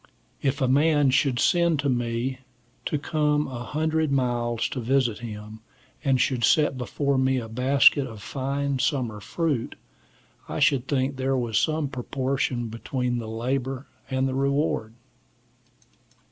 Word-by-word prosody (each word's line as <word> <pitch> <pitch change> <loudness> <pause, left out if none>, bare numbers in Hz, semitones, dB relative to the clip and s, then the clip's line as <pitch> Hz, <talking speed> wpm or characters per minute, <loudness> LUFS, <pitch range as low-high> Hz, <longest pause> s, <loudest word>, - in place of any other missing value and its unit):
If 140 +1 0
a 130 - +3
man 145 +1 +4
should 135 -1 +2
send 170 -1 +3
to 140 - -1
me 120 +1 -1 0.5
to 150 - 0
come 150 0 +1
a 125 -2 -6
hundred 155 +1 0
miles 120 -3 0
to 130 - -4
visit 125 -2 +1
him, 110 -1 -8 0.4
and 135 -3 +2
should 125 -1 +1
set 150 +3 +4
before 135 +2 -1
me 130 0 +2
a 115 -3 -3
basket 130 +3 +4
of 110 -3 -9
fine 140 0 -2
summer 125 -7 -1
fruit, 145 - -2 0.7
I - - -3
should 140 -4 +3
think 135 -1 0
there 135 0 0
was 120 -4 +1
some 155 -2 0
proportion 130 -2 -2
between 120 +2 -2
the 110 -2 -6
labor 130 +3 -2 0.2
and 130 0 +1
the 130 - -2
reward. 140 -4 0
130 Hz, 145 wpm, -25 LUFS, 120-140 Hz, 0.7 s, man